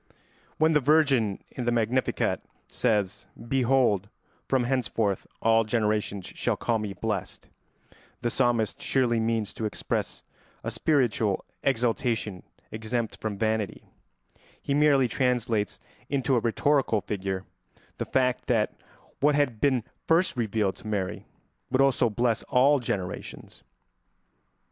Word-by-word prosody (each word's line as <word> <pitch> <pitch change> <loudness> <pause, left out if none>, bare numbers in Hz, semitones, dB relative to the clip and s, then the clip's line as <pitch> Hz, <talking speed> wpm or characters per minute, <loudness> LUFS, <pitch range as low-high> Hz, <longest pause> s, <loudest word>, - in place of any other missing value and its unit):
When 160 +1 +4
the 150 - +4
Virgin 135 -8 +3
in 125 - -5
the 120 - +2
Magnificat 120 +2 0 0.3
says, 105 -6 0 0.2
"Behold, 125 -6 +2 0.4
from 130 -2 +2
henceforth 120 -6 0 0.2
all 115 0 +5
generations 105 -3 -1
shall - - -2
call 115 -2 0
me 105 -2 -4
blessed," 100 -1 -4 0.7
the 120 - +1
psalmist 120 -4 +1
surely 120 -4 +1
means 110 -2 -1
to 110 - -4
express 105 - -3 0.4
a - - -3
spiritual 120 -9 +1 0.2
exaltation 115 -6 0 0.3
exempt 110 +1 -3
from 105 -2 -3
vanity; 110 -1 -1 0.8
he 140 - -2
merely 140 -3 +4
translates 120 -4 0 0.3
into 135 -1 +1
a - - +4
rhetorical 120 0 +2
figure 95 -2 -3 0.5
the - - -1
fact 125 -1 0
that 115 -4 +2 0.5
what 145 +1 +3
had 135 -7 0
been 130 -5 +2 0.2
first 170 +1 +3
revealed 110 -4 0
to - - -11
Mary 100 -4 -3 0.4
would 130 - +1
also 135 -3 +4
bless 115 +1 +1
all 140 +3 +5
generations. 95 -7 -5
115 Hz, 120 wpm, -27 LUFS, 105-130 Hz, 0.8 s, all